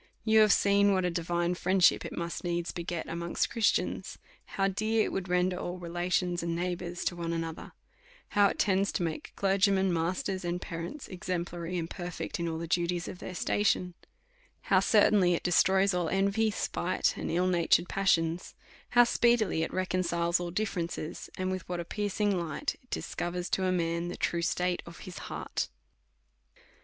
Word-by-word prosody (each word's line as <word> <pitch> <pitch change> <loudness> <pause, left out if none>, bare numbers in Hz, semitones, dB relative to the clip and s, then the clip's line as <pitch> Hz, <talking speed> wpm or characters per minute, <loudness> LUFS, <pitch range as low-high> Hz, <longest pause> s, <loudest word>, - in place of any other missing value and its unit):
You 220 0 +5
have 215 -1 +6
seen 200 0 +4
what 185 -1 +1
a 180 - +1
divine 175 +1 0
friendship 185 0 +3
it - - -7
must 170 0 -4
needs 175 -1 -1
beget 170 -1 -4
amongst 170 +1 -2
Christians; 230 -3 0 0.4
how 195 0 +3
dear 215 +3 +1
it - - -3
would 190 -1 -3
render 180 0 +2
all 180 0 -4
relations 175 0 -1
and 170 0 -2
neighbours 175 0 -3
to 175 - 0
one 170 -1 -3
another; 165 -1 -4 0.6
how 205 -1 +5
it - - -3
tends 195 0 +2
to - - -1
make 160 -2 -4
clergymen^ 195 -1 +3
masters, 180 +3 -1
and 175 0 -2
parents 170 - -6
exemplary 175 -1 -4
and 165 -1 -2
perfect 175 -1 -5
in 170 - -1
all 160 - -3
the 165 - -4
duties 175 +1 0
of 180 - -7
their 185 - -7
station; 185 -2 +1 0.8
how 190 - +7
certainly 195 -3 +4
it - - -4
destroys 190 +2 +3
all 175 -2 0
envy, 200 +4 +2
spite, 210 - -1
and - - -4
ill 175 +2 +1
natured 175 -1 +3
passions; 175 -3 +1 0.3
how 245 0 +7
speedily 235 -7 +2
it 165 - -2
reconciles 175 -2 0
all 175 -1 -3
ditferences; 170 -5 -3
and 185 0 -1
with 185 -2 -5
what 175 -1 -2
a 170 - -4
piercing 205 +1 0
light 165 - -3
it 255 - -27
discovers 175 +1 -3
to 190 - +1
a 185 - +2
man 170 -1 0
the 175 - -5
true 170 - 0
state 180 +1 0
of 170 0 -12
his 185 - -8
heart. - - -3
180 Hz, 175 wpm, -30 LUFS, 170-195 Hz, 0.8 s, how